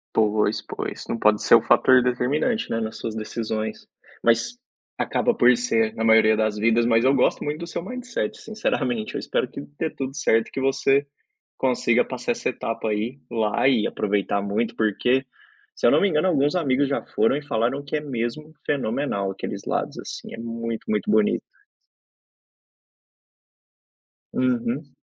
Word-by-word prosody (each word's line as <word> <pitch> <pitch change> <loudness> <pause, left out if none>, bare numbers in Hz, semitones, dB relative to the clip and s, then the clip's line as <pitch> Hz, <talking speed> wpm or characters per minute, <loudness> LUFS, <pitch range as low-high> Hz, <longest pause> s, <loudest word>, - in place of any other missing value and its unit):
Pois, 105 -1 +2
pois - - -6
não 115 - -2
pode 105 0 +3
ser - - +7
um 115 - +6
fator 130 +2 +5
determinante, 140 - 0
né, 115 - 0
nas 110 -1 -4
suas 110 -1 -5
decisões. 110 0 -4 0.4
Mas 115 - +2 0.4
acaba 240 - +1
por 125 - +5
ser 115 -2 +1
na 110 - -2
maioria 110 -1 +5
das 110 -1 0
vidas. 115 +2 +3
Mas 115 0 +3
eu 135 - +5
gosto 135 - +2
muito 150 +1 -3
do 170 - -6
seu 170 - -4
mindset, 250 +3 -4
sinceramente. 125 - -2
Eu - - -1
espero - - -1
que - - -8 0.2
dê - - -1
tudo 135 -2 -5
certo 115 -5 +2
e - - -16
que 135 - -3
você 135 +1 +2 0.5
consiga - - +2
passar 240 - -3
essa 235 0 -3
etapa 115 -2 -4
aí 110 +5 -2
lá 110 0 +1
e 120 -6 +3
aproveitar 100 0 0
muito, 110 +3 -1
porque, 125 +5 +1 0.5
se - - +1
eu - - +7
não - - +4
me 200 - +3
engano, 155 +1 +2
alguns 145 -3 +2
amigos 140 -5 +1
já 140 - -1
foram 110 +5 +1
e 150 - -4
falaram 130 0 -1
que 145 +2 -2
é - - -1
mesmo 140 +2 -4
fenomenal. 120 -7 -1
Aqueles 100 +1 -6
lados - - -2
assim - - -8
é - - -8
muito, 115 0 -4
muito 215 0 0
bonito. 210 0 +3 2.9
Uhum. 125 +3 -1
120 Hz, 170 wpm, -24 LUFS, 110-145 Hz, 2.9 s, ser